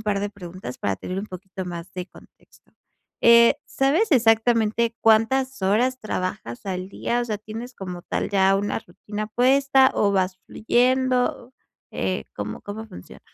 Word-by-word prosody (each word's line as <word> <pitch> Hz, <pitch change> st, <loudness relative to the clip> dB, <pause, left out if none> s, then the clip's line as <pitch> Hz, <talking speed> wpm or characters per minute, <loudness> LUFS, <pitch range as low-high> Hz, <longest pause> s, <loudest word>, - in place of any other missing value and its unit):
par 210 Hz, -2 st, -1 dB
de 205 Hz, 0 st, -2 dB
preguntas 180 Hz, -9 st, -9 dB
para 100 Hz, -1 st, -1 dB
tener 185 Hz, -, -5 dB
un 200 Hz, -, -4 dB
poquito 190 Hz, 0 st, -8 dB
más 170 Hz, 0 st, -7 dB
de 180 Hz, -1 st, -5 dB
contexto, -, -, -21 dB, 0.5 s
eh, 235 Hz, +3 st, +7 dB
¿sabes 305 Hz, +11 st, +1 dB
exactamente 230 Hz, -2 st, +3 dB
cuántas 255 Hz, +4 st, +3 dB
horas 230 Hz, +7 st, +1 dB
trabajas 185 Hz, -, -4 dB
al 185 Hz, -1 st, -4 dB
día?, 240 Hz, +4 st, -2 dB
o -, -, -1 dB
sea, 215 Hz, -2 st, -2 dB
¿tienes 225 Hz, +4 st, -8 dB
como 180 Hz, -4 st, -7 dB
tal -, -, -3 dB
ya 195 Hz, -1 st, +4 dB
una 205 Hz, +2 st, -1 dB
rutina 210 Hz, +3 st, -7 dB
puesta 265 Hz, +3 st, +4 dB
o 200 Hz, -1 st, +2 dB
vas 185 Hz, -1 st, 0 dB
fluyendo?, 250 Hz, +1 st, +1 dB, 0.4 s
eh, 95 Hz, -8 st, -2 dB
¿cómo 105 Hz, +1 st, -6 dB
cómo 215 Hz, +2 st, -7 dB
funciona? 90 Hz, -, -12 dB
215 Hz, 155 wpm, -23 LUFS, 185-245 Hz, 0.5 s, eh